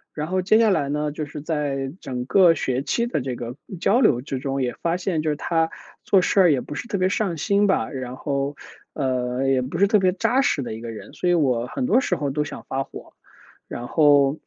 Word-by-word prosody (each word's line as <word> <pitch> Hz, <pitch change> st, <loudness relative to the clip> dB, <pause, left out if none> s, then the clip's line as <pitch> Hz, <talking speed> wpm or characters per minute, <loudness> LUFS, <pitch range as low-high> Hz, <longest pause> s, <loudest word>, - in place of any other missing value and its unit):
然 150 Hz, -, -2 dB
后 185 Hz, 0 st, +1 dB
接 200 Hz, +4 st, +4 dB
下 225 Hz, -2 st, +4 dB
来 145 Hz, -6 st, 0 dB
呢， 150 Hz, 0 st, -1 dB
就 150 Hz, 0 st, -5 dB
是 145 Hz, +1 st, -8 dB
在 140 Hz, -3 st, -2 dB
整 125 Hz, -1 st, -4 dB
个 175 Hz, +3 st, +5 dB
学 130 Hz, -3 st, -1 dB
期 235 Hz, +11 st, 0 dB
的 235 Hz, -, -2 dB
这 125 Hz, -1 st, -4 dB
个 120 Hz, 0 st, -6 dB, 0.2 s
交 225 Hz, +7 st, +3 dB
流 125 Hz, -, +3 dB
之 135 Hz, -2 st, -4 dB
中， 135 Hz, 0 st, -2 dB
也 125 Hz, -, -1 dB
发 170 Hz, +1 st, 0 dB
现 180 Hz, -3 st, -1 dB
就 155 Hz, -, -1 dB
是 150 Hz, -, 0 dB
他 165 Hz, +1 st, 0 dB, 0.4 s
做 190 Hz, -2 st, +4 dB
事 -, -, +2 dB
儿 180 Hz, -4 st, +6 dB
也 135 Hz, -, +2 dB
不 145 Hz, -, -7 dB
是 235 Hz, -, -6 dB
特 205 Hz, -, -2 dB
别 185 Hz, 0 st, +2 dB
上 190 Hz, -3 st, -1 dB
心 200 Hz, +6 st, +2 dB
吧。 150 Hz, -12 st, +1 dB
然 130 Hz, -1 st, -5 dB
后， 140 Hz, 0 st, -2 dB, 0.4 s
呃， 130 Hz, -1 st, -1 dB
也 135 Hz, -1 st, +2 dB
不 130 Hz, +2 st, -4 dB
是 200 Hz, -, +5 dB
特 210 Hz, +1 st, +3 dB
别 185 Hz, -1 st, +3 dB
扎 245 Hz, +7 st, +1 dB
实 155 Hz, -, +1 dB
的 120 Hz, -, -5 dB
一 110 Hz, -, -8 dB
个 115 Hz, -, -6 dB
人， 110 Hz, -2 st, -9 dB
所 180 Hz, -, -1 dB
以 175 Hz, -, +4 dB
我 125 Hz, -7 st, +1 dB
很 255 Hz, -, -3 dB
多 255 Hz, 0 st, +3 dB
时 180 Hz, -, 0 dB
候 145 Hz, -2 st, -2 dB
都 150 Hz, +2 st, 0 dB
想 -, -, -9 dB
发 135 Hz, +1 st, -2 dB
火。 -, -, -12 dB, 0.5 s
然 120 Hz, +1 st, -6 dB
后， 145 Hz, -2 st, +4 dB
150 Hz, 265 characters per minute, -23 LUFS, 130-180 Hz, 0.5 s, 儿